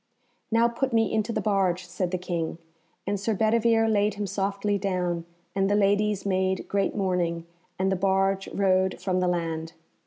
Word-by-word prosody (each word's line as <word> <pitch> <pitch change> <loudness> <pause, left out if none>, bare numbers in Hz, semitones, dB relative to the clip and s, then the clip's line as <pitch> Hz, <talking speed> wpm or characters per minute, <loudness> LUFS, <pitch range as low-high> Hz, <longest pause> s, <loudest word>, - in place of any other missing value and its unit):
"Now 230 +1 +4
put 245 +2 -2
me 225 -1 +2
into 215 +1 0
the - - -1
barge," 190 -3 +1
said 180 +1 -3
the 185 - -1
King, 170 -3 -3 0.5
and 200 0 -1
Sir 215 +2 -1
Bedivere 225 +1 +3
laid 210 -1 +2
him 205 0 -3
softly 200 +1 -1
down, 180 -3 -1 0.3
and 195 0 +1
the 205 - +3
ladies 205 0 +2
made 190 -1 0
great 200 -1 0
mourning, 180 -4 -1 0.3
and 190 +1 +1
the - - +2
barge 195 +1 +1
rowed 190 -1 +1
from 185 -1 0
the 180 - +1
land. 165 -2 -2
195 Hz, 175 wpm, -26 LUFS, 180-210 Hz, 0.5 s, Now